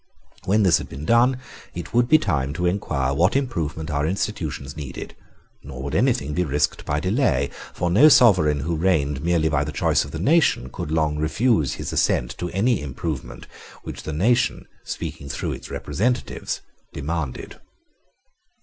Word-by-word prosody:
When 105 +3 +3
this 90 -3 +4
had - - -8
been 70 +3 -7
done, 120 +4 +4 0.4
it - - -7
would 120 0 +3
be 155 - +8
time 70 - -1
to 90 +3 -2
inquire 75 -8 0
what 85 - +2
improvement 85 - -2
our 75 +1 0
institutions 80 -7 -3
needed: 70 -4 -7 0.5
nor 65 -2 -8
would 70 +1 -4
anything 100 - +1
be 90 - +1
risked 75 -2 -1
by 75 +1 0
delay; 90 - +1 0.2
for 90 - -2
no 130 - +7
sovereign 90 - +5
who 85 +4 -2
reigned 75 -5 +1
merely 85 -2 +2
by 75 -2 +1
the 75 - -4
choice - - +1
of - - -9
the - - -6
nation 145 - +2
could - - -5
long 75 -1 0
refuse 80 - +1
his - - -5
assent - - +1
to 90 - -3
any 105 - +1
improvement 75 +1 -5 0.4
which - - -7
the - - -5
nation, 115 +11 +1 0.2
speaking 70 - -6
through 70 - -3
its - - -7
representatives, 125 +4 -2 0.3
demanded. 75 -2 -4
80 Hz, 165 wpm, -23 LUFS, 70-105 Hz, 0.5 s, be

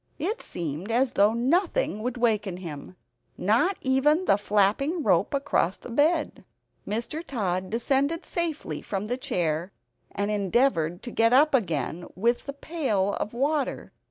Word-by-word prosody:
It 415 +8 -2
seemed 170 +5 -5
as 250 +2 +2
though 210 +3 +4
nothing 335 - +1
would 250 +2 -3
waken 210 -6 0
him 170 -1 -8 0.4
not 235 - +2
even 295 +7 +2
the - - +5
flapping 210 - +1
rope - - +2
across 275 -10 0
the - - -10
bed. 300 +5 +1 0.4
Mr. 235 +10 -3
Tod 190 - -2
descended 275 +7 0
safely 335 -3 -3
from 195 0 -3
the 245 +3 -2
chair, 170 -5 -1 0.4
and 205 +1 -2
endeavored 195 - +1
to 240 - -6
get 230 +1 +3
up 295 +4 +5
again 175 - -1
with 235 +8 0
the 280 - -4
pail 265 - -1
of 215 - -4
water. 285 +2 -1
235 Hz, 145 wpm, -26 LUFS, 195-280 Hz, 0.4 s, the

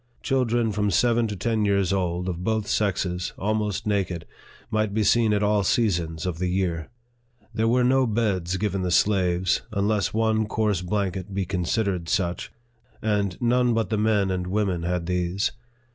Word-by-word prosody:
Children 120 -3 +1
from 105 0 0
seven 115 +4 +2
to 105 - -4
ten 110 +3 0
years 100 -2 +2
old, 90 -1 -1
of 90 -1 -3
both 110 0 0
sexes, 95 -4 -1
almost 105 -1 -1
naked, 95 -6 -1 0.5
might 110 -2 0
be 110 - +2
seen 115 +1 +3
at 105 0 +1
all 105 -1 +2
seasons 85 -7 0
of 90 -3 -3
the 90 - 0
year. 90 -4 -1 0.6
There 110 0 +1
were 125 +2 +3
no 130 +1 +3
beds 100 -6 0
given 100 -1 -1
the 90 - -1
slaves, 90 -2 +2
unless 105 -1 0
one 110 -1 +1
coarse 105 -4 0
blanket 95 0 -2
be 100 -1 0
considered 90 -1 -1
such, 90 -2 -1 0.5
and 100 -4 -1
none 120 0 +2
but 115 -3 -1
the 110 - +1
men 105 -3 +2
and 90 -1 -2
women 95 -3 0
had 90 0 -2
these. 90 +3 0
100 Hz, 165 wpm, -25 LUFS, 90-110 Hz, 0.6 s, seen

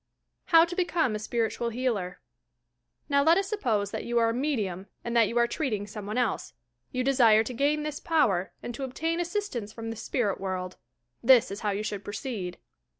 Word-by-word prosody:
HOW 330 -1 +7
TO 350 +1 -6
BECOME 345 - +1
A 215 - -2
SPIRITUAL 230 +1 -1
HKALER 225 -7 -2 0.9
Now 280 -1 +3
let 325 +3 +5
us 390 0 0
suppose 230 - 0
that - - -4
you 240 0 -1
are 230 -1 +4
a - - 0
medium, 215 -9 -2 0.2
and 235 0 -3
that 230 -2 +5
you 235 - -3
are 235 - +5
treating 235 -5 -2
some 205 0 -8
one 215 +3 -3
else. 250 - -1 0.4
You 255 0 -1
desire 240 -5 +5
to 250 - -5
gain 290 +4 +1
this 300 0 -4
power 205 - +1
and 240 - -5
to 275 - -5
obtain 325 +6 -2
assistance 345 - -3
from 225 0 -6
the - - -5
spirit 215 -3 -1
world. 185 -1 -4 0.4
This 240 -4 +6
is 200 - -5
how 210 - -1
you 200 +1 -1
should 205 -2 -4
proceed. 205 -3 -5
235 Hz, 200 wpm, -28 LUFS, 210-285 Hz, 0.9 s, HOW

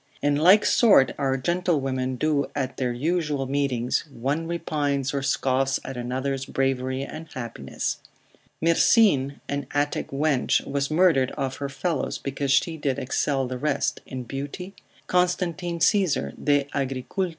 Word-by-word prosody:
In 145 0 +1
like 185 +8 +6
sort 205 - +5
our 135 -1 +1
gentlewomen 135 -5 0
do 145 +1 +1
at 130 -2 -3
their 125 -2 0
usual 150 +1 -1
meetings, 130 -3 0
one 140 +6 -2
repines 145 -5 -1
or 140 - -1
scoffs 135 0 +1
at 135 - -5
another's 130 +2 -2
bravery 130 0 -1
and 155 +3 -8
happiness. 115 - -4 0.6
Myrsine, 165 - +4
an 140 -1 -3
Attic 145 0 0
wench, 140 -1 +1
was 140 0 -1
murdered 155 -5 +3
of 135 -1 -3
her 140 -1 -4
fellows, 155 +1 -2
because 140 0 -3
she 160 +4 +2
did 140 -3 -1
excel 135 0 0
the 125 0 -5
rest 150 +2 -1
in 130 -1 -5
beauty, 145 +10 -6 0.3
Constantine, 180 -1 0
Agricult. 145 - 0
140 Hz, 130 wpm, -25 LUFS, 130-160 Hz, 0.6 s, like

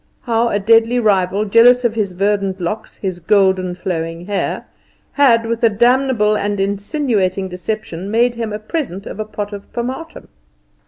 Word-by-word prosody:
How 235 -1 +1
a 205 - 0
deadly 225 +3 +3
rival, 200 -2 +1
jealous 240 +4 +5
of 235 - +2
his 210 -4 -2
verdant 195 0 0
locks, 195 +5 -5
his 185 -3 -4
golden 190 -1 +2
flowing 165 -2 -4
hair, 200 0 -2 0.5
had, 235 -5 +4
with 230 0 -3
a 230 - +6
damnable 240 -1 +2
and 205 -1 -2
insinuating 200 -1 -1
deception, 185 0 -5
made 235 +3 +2
him 230 -2 -4
a 210 - -3
present 215 - -4
of - - -8
a 215 - -2
pot 210 -1 -6
of 200 -1 -9
pomatum. 260 +7 -5
210 Hz, 160 wpm, -17 LUFS, 195-230 Hz, 0.5 s, a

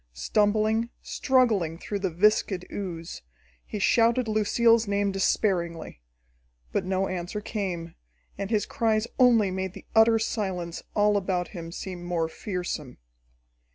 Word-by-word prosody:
Stumbling, 215 - +1
struggling 220 -11 +1
through 200 +3 -4
the 190 -1 -1
viscid 190 +1 +2
ooze, 170 -4 -6 0.4
he - - -6
shouted 230 +4 +3
Lucille's 220 +1 +3
name 200 0 +1
despairingly. 175 - -1 0.7
But - - -1
no 190 +1 0
answer 180 +3 -4
came, 185 -6 -4 0.4
and 200 - -4
his 215 -2 +1
cries 225 -4 +1
only 230 -6 +5
made 190 0 -3
the - - -12
utter 225 +1 +6
silence 190 -6 -3
all 210 0 +3
about 185 -2 -1
him 165 -4 -8
seem 180 0 -6
more 175 -2 -1
fearsome. 175 - -5
200 Hz, 125 wpm, -26 LUFS, 175-215 Hz, 0.7 s, utter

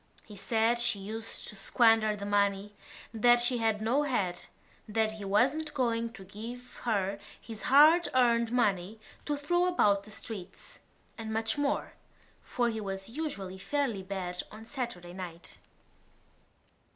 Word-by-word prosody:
He 210 - -12
said 225 +4 +1
she 240 -3 +2
used 220 +3 -5
to - - -9
squander 220 +1 +3
the 200 -1 -6
money, 200 0 +1 0.4
that 240 +2 +5
she 240 0 +1
had 220 -1 +1
no 250 +6 +2
head, 205 -11 -1 0.4
that 220 0 +1
he 215 -2 -7
wasn't 275 +10 +1
going 230 -3 0
to 195 - -10
give 230 +6 -9
her 200 -3 0 0.2
his 225 -2 -9
hard 310 +6 +7
earned 235 -2 +3
money 210 -4 +1 0.3
to 295 -1 -1
throw 350 +5 +1
about 205 - +3
the 215 - -13
streets, 205 -3 -8 0.4
and 220 -1 -5
much 220 0 0
more, 290 -1 -1 0.5
for 240 -1 -1
he 220 -2 -2
was 195 0 -5
usually 200 -10 -5
fairly 265 -3 -1
bad 185 -2 -4
of 215 - -10
a - - -14
Saturday 230 -10 -5
night. 175 -2 -8
220 Hz, 150 wpm, -30 LUFS, 200-245 Hz, 0.5 s, hard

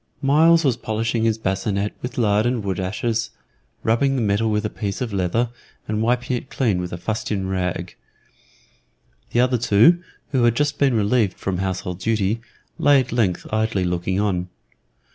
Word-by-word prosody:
Myles 165 +4 +5
was 125 -4 +2
polishing 110 +1 -1
his 110 -1 +2
bascinet 100 0 -1
with 125 0 -6
lard 105 -1 +2
and 120 -3 -1
wood 95 -2 -2
ashes, 110 +5 -1 0.5
rubbing 135 +5 +2
the 130 - 0
metal 105 +2 +1
with 105 0 0
a - - 0
piece 100 -3 -4
of 120 -5 -3
leather, 100 +6 0 0.4
and 110 0 -1
wiping 125 +2 +1
it 120 - -6
clean 105 -9 0
with 90 0 -5
a 85 - -4
fustian 100 0 -2
rag. 90 -2 -2 1.4
The 120 - +2
other 125 -1 +2
two, 115 - +5 0.3
who 130 -4 +2
had 120 -1 +3
just 145 +1 0
been 135 -4 +3
relieved 105 -1 +1
from 95 -2 -3
household 95 -1 -3
duty, 110 +1 0 0.4
lay 145 -1 +5
at 130 - -3
length 110 -7 0
idly 110 -3 +1
looking 90 +2 -1
on. 90 -3 -1
110 Hz, 170 wpm, -22 LUFS, 95-120 Hz, 1.4 s, Myles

